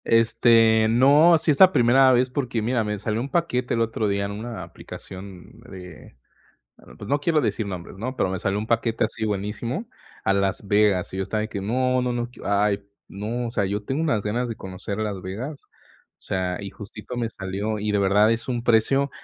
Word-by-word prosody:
Este, 115 -1 +4
no, 145 +8 +6
sí 155 - +1
es 140 - -1
la 185 -1 +8
primera 130 -1 +5
vez 125 0 +2
porque 125 -5 -2
mira, 120 0 +1
me 105 0 -3
salió 110 +2 -2
un 135 - -4
paquete 125 -7 0
el 115 - 0
otro 115 -1 -1
día 100 0 0
en 100 - -4
una 110 -1 -6
aplicación 95 +2 -11
de 90 -7 -12 0.6
bueno, - - -16
pues 100 - -9
no 145 +1 +2
quiero 155 +1 +2
decir 110 -2 -1
nombres, 90 -1 -7
¿no? 130 +5 -4
Pero 95 - 0
me 95 - -2
salió 95 +2 -1
un 105 - -4
paquete 115 0 +1
así 110 0 -3
buenísimo 105 - -3 0.4
a 95 - +3
Las 100 +1 -1
Vegas, 100 -3 +2
y 95 - -5
yo - - 0
estaba 105 +2 -2
que: 105 -2 -5
"No, 125 +5 +1
no, 125 0 -1
no, 120 0 -3
que 125 - -16
ay, 100 0 +1 0.2
no", 110 +5 -4
o - - -6
sea, 105 -4 0
yo 105 +2 -3
tengo 135 +7 -2
unas 145 -11 0
ganas 120 +4 -1
de 115 - -5
conocer 95 +2 -6
Las 105 -3 -3
Vegas, 120 +11 -6 0.5
o - - -40
sea, 90 -1 -2
y 100 -1 -6
justito 105 +4 -9
me 115 -1 -1
salió, 100 +1 -4
y 105 0 -2
de 105 - +2
verdad 100 +3 +4
es 115 +1 -4
un 120 -2 -2
precio 130 +4 +3
110 Hz, 215 wpm, -24 LUFS, 100-125 Hz, 0.6 s, la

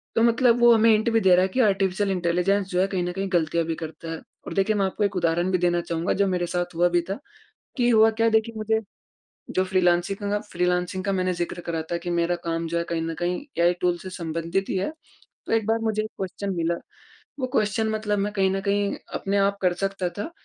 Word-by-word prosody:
तो - - +3
मतलब 235 +1 +4
वो 240 0 +8
हमें 225 0 +5
हिंट 220 +2 +3
भी 225 - +4
दे 185 -2 +6
रहा 180 - +4
है 190 - +2
कि 255 - -3
आर्टिफिशियल 195 -1 +1
इंटेलिजेंस 180 +2 +1
जो 180 -1 +1
है 195 - +2
कहीं 185 -2 -2
न 175 - -2
कहीं 195 +1 -2
गलतियाँ 165 -1 +1
भी 165 0 -2
करता 160 +1 -7
है। 165 - -5 0.3
और - - -4
देखिए 195 +2 +1
मैं 195 -2 +2
आपको 190 +2 -2
एक 200 -1 0
उदाहरण 175 +1 +1
भी 185 - +3
देना 175 -1 +1
चाहूँगा 170 0 -1
जो 200 - +3
मेरे 180 -2 0
साथ 175 0 -3
हुआ 175 +1 +3
भी 175 0 +2
था 195 - -3 0.6
कि 245 -2 +2
हुआ 220 -1 +6
क्या 225 +1 +1
देखिए 220 +1 +1
मुझे 220 +1 0 0.8
जो 185 - +3
फ्रीलांसिंग 185 0 +2
का 205 - -4
काम 205 0 0
फ्रीलांसिंग 180 +1 0
का 200 - +1
मैंने 185 -1 0
ज़िक्र 175 0 -4
करा 165 -1 -3
था 170 - +1
कि 175 +1 -6
मेरा 170 0 +1
काम 165 0 -1
जो 170 +1 -2
है 170 - 0
कहीं 165 -1 0
न 165 0 -3
कहीं 180 +8 -1 0.2
ऐआई 175 +1 +4
टूल 175 -1 +2
से 185 - -8
संबंधित 170 +2 -2
ही - - 0
है 190 +9 -1 0.5
तो - - -2
एक 225 -2 +2
बार 225 +1 +2
मुझे 215 -1 0
एक 215 - -6
क्वेश्चन 195 +1 -4
मिला, 170 0 0 0.6
वो 255 - -1
क्वेश्चन 220 -2 +1
मतलब 215 -1 -1
मैं 205 +1 -1
कहीं 195 -2 +2
न 195 - -1
कहीं 200 0 0 0.2
अपने 200 +1 -1
आप 200 0 +2
कर 180 -1 +3
सकता 195 -1 -2
था 205 +11 -4
190 Hz, 245 wpm, -24 LUFS, 175-205 Hz, 0.8 s, वो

